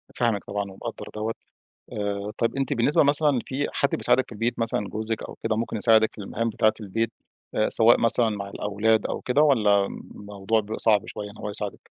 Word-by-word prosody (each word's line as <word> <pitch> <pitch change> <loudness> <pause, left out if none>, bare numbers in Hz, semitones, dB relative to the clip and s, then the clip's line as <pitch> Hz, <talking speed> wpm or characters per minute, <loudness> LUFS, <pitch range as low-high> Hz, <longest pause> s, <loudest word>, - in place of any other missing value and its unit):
فاهمِك 115 -5 0
طبعًا 100 0 -3
ومقدّر 95 - -7
دوَّة 110 +1 -2 0.6
آآ، 100 0 -3
طيب 115 - 0
أنتِ 135 -2 -1
بالنسبة 120 +6 +3
مثلًا 145 -1 +3
فيه 140 +2 -2
حد 140 - +1
بيساعدِك 130 - +2
في - - -11
البيت 115 +3 -2
مثلًا 110 -3 -1
جوزِك 110 +1 -2
أو - - -8
كده 110 -1 0
ممكن 115 0 -2
يساعدِك 110 0 +4
في - - -17
المهام 115 +3 -2
بتاعة 110 0 +2
البيت، 115 +3 -2 0.4
آآ 110 - +2
سواء 115 +1 +4
مثلًا 115 -1 +3
مع 100 -1 -5
الأولاد 105 +2 0
أو - - -4
كده؟ 140 +4 +2
والَّا 105 -9 +4
الموضوع 105 +3 -3
بيبقى 110 +1 -6
صعب 105 -3 +4
شوية 105 -1 -7
إن 105 - -15
هو 105 - -5
يساعدِك؟ 105 -1 -2
110 Hz, 195 wpm, -25 LUFS, 105-115 Hz, 0.6 s, يساعدِك